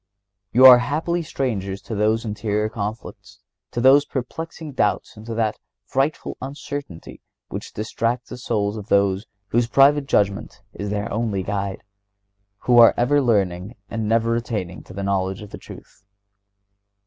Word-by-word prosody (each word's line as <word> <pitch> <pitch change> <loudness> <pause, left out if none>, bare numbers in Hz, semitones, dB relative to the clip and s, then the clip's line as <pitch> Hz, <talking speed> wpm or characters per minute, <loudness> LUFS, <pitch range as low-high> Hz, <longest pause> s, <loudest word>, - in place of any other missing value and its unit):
You 130 +4 +6
are 125 -2 +11
happily 160 +7 -1
strangers 105 - -3
to - - -6
those 110 +2 +1
interior 105 0 -1
conflicts, 110 0 -7 0.3
to - - -4
those 135 +3 +6
perplexing 155 +4 -6
doubts 105 -6 -1
and 110 +1 -12
to 115 - -4
that 110 -2 -1 0.3
frightful 135 +4 -1
uncertainty 140 - -7 0.3
which - - -6
distracts 115 +3 -3
the 125 - -6
souls 105 -3 -1
of 105 -1 -8
those 100 0 +2 0.2
whose 120 0 +2
private 140 +2 +4
judgment 100 -3 0
is 100 - -5
their 100 0 -3
only 105 -4 -1
guide, 100 0 -3 0.8
who 120 -1 +4
are 115 - +8
"ever 145 +4 +3
learning 100 -3 0 0.2
and 110 -2 -2
never 115 +1 +2
attaining 105 -7 -4
to - - -12
the 100 +1 -5
knowledge 95 0 -1
of 105 - -12
the - - -8
truth." 100 - -14
110 Hz, 150 wpm, -22 LUFS, 100-125 Hz, 0.8 s, are